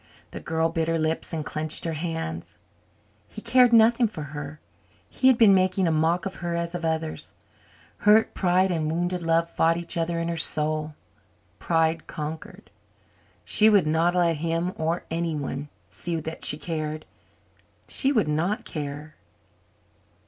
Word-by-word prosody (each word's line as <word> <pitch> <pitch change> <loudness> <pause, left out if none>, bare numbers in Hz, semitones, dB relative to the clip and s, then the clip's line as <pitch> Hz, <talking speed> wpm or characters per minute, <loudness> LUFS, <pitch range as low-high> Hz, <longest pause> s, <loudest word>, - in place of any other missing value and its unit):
The - - -7
girl 160 0 -1
bit 165 -1 -2
her 165 0 +1
lips 160 0 -2
and 155 -2 -4
clenched 155 +2 -2
her 165 - -2
hands. 160 - -5 0.7
He - - -9
cared 245 +2 +4
nothing 230 +1 +5
for 185 -8 -7
her 145 0 -7 0.5
he 260 - +1
had 260 -3 +6
been 220 -4 +6
making 185 0 +2
a - - +2
mock 165 +4 +1
of 195 - -5
her 175 -1 -3
as 170 0 -3
of 175 -1 -5
others. 160 -1 -3 0.6
Hurt 210 +2 +4
pride 185 0 +2
and 160 -3 -1
wounded 175 +2 -2
love 165 0 +1
fought 165 0 +1
each 170 0 -4
other 170 0 -1
in 165 - -2
her 170 0 -3
soul. 155 -1 +2 0.6
Pride 165 -1 0
conquered. 155 +1 -7 0.7
She 215 +1 +4
would 205 -5 +4
not 165 +3 +1
let 170 -3 +2
him, 165 +3 -2
or 165 +2 -2
anyone, 150 -4 -3 0.2
see 170 -2 -3
that 160 +1 -7
she 150 - +2
cared. 155 -1 -4 0.8
She 270 - +2
would 220 - +2
not 175 +10 -1
care! 150 0 -6
165 Hz, 155 wpm, -25 LUFS, 155-180 Hz, 0.8 s, had